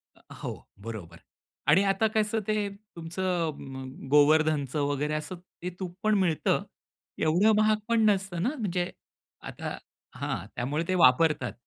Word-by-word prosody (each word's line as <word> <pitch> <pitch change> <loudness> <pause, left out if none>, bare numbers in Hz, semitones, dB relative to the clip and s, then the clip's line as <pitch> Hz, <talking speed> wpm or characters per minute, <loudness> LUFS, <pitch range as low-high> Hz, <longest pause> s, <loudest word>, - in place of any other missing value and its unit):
अ, - - -23 0.2
हो, - - -2 0.3
बरोबर 90 -7 -7 0.5
आणि 175 +7 +6
आता 195 +2 +2
कसं 215 +1 +2
ते 215 -1 +1 0.3
तुमचं 170 0 -1 0.2
म 130 0 -6 0.3
गोवर्धनचं 150 -1 +4
वगैरे 145 +2 -1
असं 155 +4 -3 0.3
ते 180 - -3
तूप 180 -2 -5
पण 215 0 +3
मिळतं. 170 -5 +1 0.5
एवढं 175 +8 +4
महाग 215 0 +4
पण 230 -1 +3
नसतं 190 -4 0
ना, 245 - +2
म्हणजे 180 -4 -1 0.6
आता - - -5 0.4
हां, 85 - -3
त्यामुळे 145 +7 -1
ते 185 - +1
वापरतात. 130 0 +4
170 Hz, 140 wpm, -28 LUFS, 150-195 Hz, 0.6 s, आणि